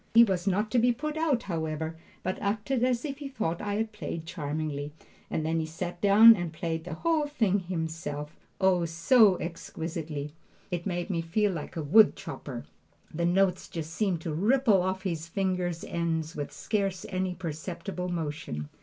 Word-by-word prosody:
He 230 - +10
was 190 -4 0
not 205 +3 +1
to 245 - +4
be 245 +2 +4
put 300 +5 -3
out, 305 -7 +1
however, 160 -2 -3 0.3
but 185 - -2
acted 215 +5 0
as 250 +1 +1
if 280 -1 -4
he 285 - -5
thought 215 -11 -2
I 205 -1 -2
had 220 +1 -1
played 170 -6 -5
charmingly, 150 -2 -3 0.4
and 155 - -1
then 165 +1 +1
he 160 - -2
sat 175 +2 -5
down 215 +3 +9
and 175 -4 -3
played 165 0 -3
the 175 -3 -5
whole 315 - +1
thing 220 -9 +1
himself, 160 -4 -4 0.2
oh, 185 -3 +3
so 185 +5 +5
exquisitely! 160 -3 -5 0.4
It 175 +1 -2
made 175 +1 -2
me 170 -3 0
feel 200 +5 +1
like 165 -5 -6
a 160 - -2
wood 210 +9 +6
chopper. 140 -7 -7 0.5
The 170 +2 0
notes 185 +1 +2
just 160 -1 -5
seemed 185 -4 0
to 165 -2 -3
ripple 215 - +4
off 190 +1 -2
his 165 -4 -3
fingers' 180 -2 -1
ends 165 -1 -2
with 145 -1 -4
scarce 195 -3 -2
any 185 -1 -1
perceptible 180 +2 -5
motion. 150 - -4
180 Hz, 175 wpm, -29 LUFS, 160-205 Hz, 0.5 s, He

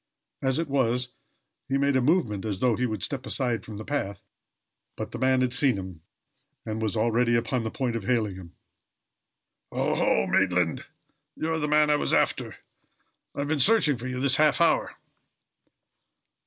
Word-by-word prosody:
As 130 -1 +1
it 165 -1 -1
was, 125 -3 0 0.6
he 135 - +1
made 140 0 +1
a 130 - +3
movement 125 - +1
as 105 -4 -3
though 125 -1 +2
he 125 +2 0
would 110 -4 -4
step 135 -2 -3
aside 120 -4 -1
from 105 -2 -9
the 110 - -7
path, 100 -10 -3 0.7
but - - -5
the - - -6
man 130 0 +2
had 125 -1 0
seen 130 -3 +2
him, 95 -4 -8 0.6
and 110 0 -4
was 110 -3 -1
already 120 +2 +2
upon 120 +2 0
the 110 - -3
point 125 -1 -2
of 110 -4 -4
hailing 110 -5 +1
him. 90 -2 -12 1.2
"Oho! 65 - +1
Maitland, 90 -4 +1 0.5
you 160 +1 -2
are 160 - -1
the 150 - -1
man 150 0 +4
I 150 - +4
was - - +1
after. - - 0 0.8
I've 140 0 -2
been 155 0 0
searching 155 - +4
for 125 - -5
you 125 0 -4
this 135 -1 +2
half 150 -1 +3
hour." 165 -1 +2
125 Hz, 175 wpm, -26 LUFS, 110-140 Hz, 1.2 s, man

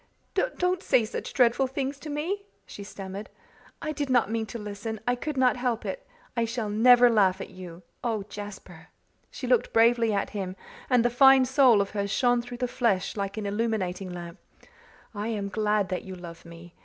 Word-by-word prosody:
"Don't 365 -6 0
say 255 - +3
such 215 - -5
dreadful 250 +1 +3
things 275 +1 -3
to 305 - -8
me," 325 +8 -2 0.2
she 200 - -9
stammered, 195 0 -8 0.5
"I 310 - -2
did 290 -2 -3
not 245 -4 +3
mean 225 -1 -1
to 235 - -6
listen. 210 +1 -6
I 245 - +3
could 285 +3 -4
not 255 -1 +3
help 245 -2 -1
it. - - -5 0.3
I 235 - +1
shall 225 -2 -3
never 245 +3 +7
laugh 195 -5 +3
at - - -7
you. 180 -2 -10 0.2
Oh, 225 -4 -1
Jasper" 195 -5 -10 0.4
she - - -7
looked 250 -1 +2
bravely 230 0 +4
at 200 -1 -1
him 190 -3 -4 0.3
and 245 -2 +4
the 240 - +3
fine 265 +1 +7
soul 255 -5 +5
of 200 - -3
her 200 -1 -2
shone 245 +4 +2
through 245 0 -8
the 250 0 -1
flesh 220 -6 0
like 200 0 -3
an 215 - -3
illuminating 200 -3 -2
lamp 175 -1 -8 0.7
"I 205 +1 -4
am 205 -3 -2
glad 210 -2 0
that 185 - -2
you 190 -1 -8
love 170 -2 -10
me! 170 +1 -12
225 Hz, 190 wpm, -27 LUFS, 200-250 Hz, 0.7 s, never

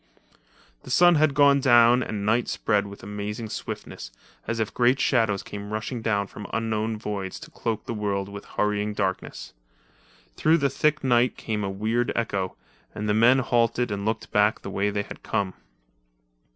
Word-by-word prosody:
The - - -12
sun 175 +7 +6
had 150 -3 +3
gone 140 -1 +5
down 120 -1 +5
and 105 -4 -4
night 115 +3 +2
spread 105 -2 0
with 100 -1 -11
amazing 105 +2 -5
swiftness, - - -6 0.4
as 115 0 -2
if 110 - -2
great 125 +2 +3
shadows 110 -6 +2
came 100 0 -8
rushing 110 +3 -3
down 105 -3 0
from 100 +1 -9
unknown 110 0 -1
voids 100 -3 -5
to - - -11
cloak 110 -2 -3
the - - -4
world 100 -2 -2
with 100 0 -8
hurrying 105 0 -1
darkness. 95 -2 -3 0.8
Through 160 +1 +4
the 140 -4 +1
thick 150 +2 +1
night 125 -1 +2
came 105 -2 -3
a 100 - -2
weird 110 +5 -1
echo, 100 -5 -2 0.4
and 105 - -3
the 105 - +2
men 115 +4 +5
halted 120 -1 +1
and 100 -1 -3
looked 110 +1 -3
back 105 +1 +2
the 100 - -6
way 100 +1 0
they 100 0 -2
had - - -11
come. 95 -2 -2
110 Hz, 175 wpm, -25 LUFS, 100-120 Hz, 0.8 s, sun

